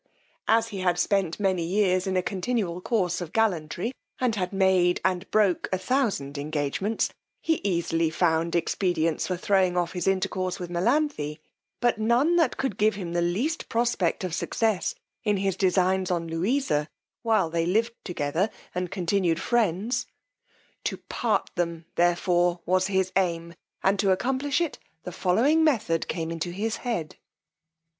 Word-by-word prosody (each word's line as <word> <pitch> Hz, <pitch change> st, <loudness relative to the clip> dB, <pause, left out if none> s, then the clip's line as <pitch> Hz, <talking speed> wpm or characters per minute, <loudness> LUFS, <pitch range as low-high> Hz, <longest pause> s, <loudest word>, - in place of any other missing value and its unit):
As 225 Hz, 0 st, +3 dB
he 200 Hz, -3 st, -5 dB
had 180 Hz, -2 st, +1 dB
spent 185 Hz, -1 st, +1 dB
many 190 Hz, -3 st, +1 dB
years 185 Hz, +1 st, +1 dB
in 190 Hz, -1 st, 0 dB
a 180 Hz, -, +1 dB
continual 190 Hz, -3 st, -2 dB
course 180 Hz, -5 st, 0 dB
of 170 Hz, -2 st, -6 dB
gallantry, 185 Hz, -1 st, 0 dB, 0.3 s
and 250 Hz, -3 st, +1 dB
had 180 Hz, -3 st, -2 dB
made 190 Hz, -2 st, +3 dB
and 185 Hz, -1 st, 0 dB
broke 205 Hz, -4 st, +2 dB
a 185 Hz, -, +1 dB
thousand 190 Hz, -, -1 dB
engagements, 150 Hz, +8 st, -1 dB, 0.3 s
he 320 Hz, -1 st, 0 dB
easily 170 Hz, -4 st, +1 dB
found 165 Hz, +1 st, +1 dB
expedients 170 Hz, -1 st, 0 dB
for 180 Hz, -, -1 dB
throwing 185 Hz, -1 st, +2 dB
off 175 Hz, -1 st, 0 dB
his 180 Hz, -1 st, -3 dB
intercourse 185 Hz, -1 st, 0 dB
with 175 Hz, -1 st, -6 dB
Melanthe, 185 Hz, -, 0 dB, 0.4 s
but 240 Hz, -2 st, +1 dB
none 240 Hz, +10 st, +3 dB
that 330 Hz, -, +2 dB
could 265 Hz, -8 st, -2 dB
give 215 Hz, +1 st, +3 dB
him 175 Hz, -4 st, -5 dB
the 175 Hz, -, +1 dB
least 215 Hz, -, -1 dB
prospect 230 Hz, -7 st, 0 dB
of 180 Hz, -3 st, -3 dB
success 215 Hz, +2 st, 0 dB, 0.3 s
in 210 Hz, -1 st, +2 dB
his 195 Hz, -1 st, 0 dB
designs 185 Hz, 0 st, +2 dB
on 170 Hz, -2 st, -1 dB
Louisa 165 Hz, -, 0 dB, 0.3 s
while 220 Hz, -8 st, +2 dB
they 165 Hz, 0 st, 0 dB
lived 225 Hz, +5 st, +1 dB
together 170 Hz, +3 st, -1 dB, 0.2 s
and 180 Hz, 0 st, -2 dB
continued 180 Hz, -2 st, 0 dB
friends: 230 Hz, +1 st, 0 dB, 0.8 s
to -, -, -1 dB
part -, -, -1 dB
them 170 Hz, -2 st, -2 dB
therefore 175 Hz, 0 st, +2 dB
was 185 Hz, +1 st, +2 dB
his 190 Hz, -2 st, 0 dB
aim, 170 Hz, -3 st, 0 dB, 0.3 s
and 195 Hz, +1 st, +2 dB
to 195 Hz, -, +2 dB
accomplish 265 Hz, -, +1 dB
it 335 Hz, -4 st, -2 dB, 0.2 s
the 180 Hz, -, -6 dB
following 230 Hz, -, +3 dB
method 220 Hz, -, +1 dB
came 165 Hz, -2 st, -3 dB
into 165 Hz, +1 st, -3 dB
his 215 Hz, +5 st, -2 dB
head. 225 Hz, -11 st, -3 dB
185 Hz, 155 wpm, -26 LUFS, 170-220 Hz, 0.8 s, As